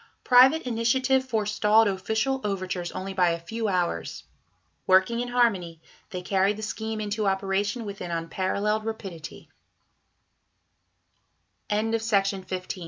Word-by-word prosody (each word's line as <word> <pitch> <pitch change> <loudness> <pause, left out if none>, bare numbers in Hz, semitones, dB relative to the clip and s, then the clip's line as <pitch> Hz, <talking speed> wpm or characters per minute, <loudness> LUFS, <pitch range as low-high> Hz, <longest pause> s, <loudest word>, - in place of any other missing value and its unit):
Private 260 +6 +6
initiative 260 +3 +1
forestalled 215 -2 +2
official 220 +7 -1
overtures 185 -3 -3
only 190 +1 -5
by 180 -2 +3
a 170 0 -1
few 225 +7 -4
hours. 180 -3 -2 0.6
Working 190 +5 +4
in 245 - -2
harmony, 200 -10 +1 0.3
they 180 -4 -6
carried 195 +2 +1
the 215 - -7
scheme 220 +1 -4
into 210 0 -2
operation 195 +4 -1
with 200 -1 -7
an 180 - -5
unparalleled 190 +6 -1
rapi 195 -7 -7
210 Hz, 105 wpm, -26 LUFS, 185-225 Hz, 0.6 s, Private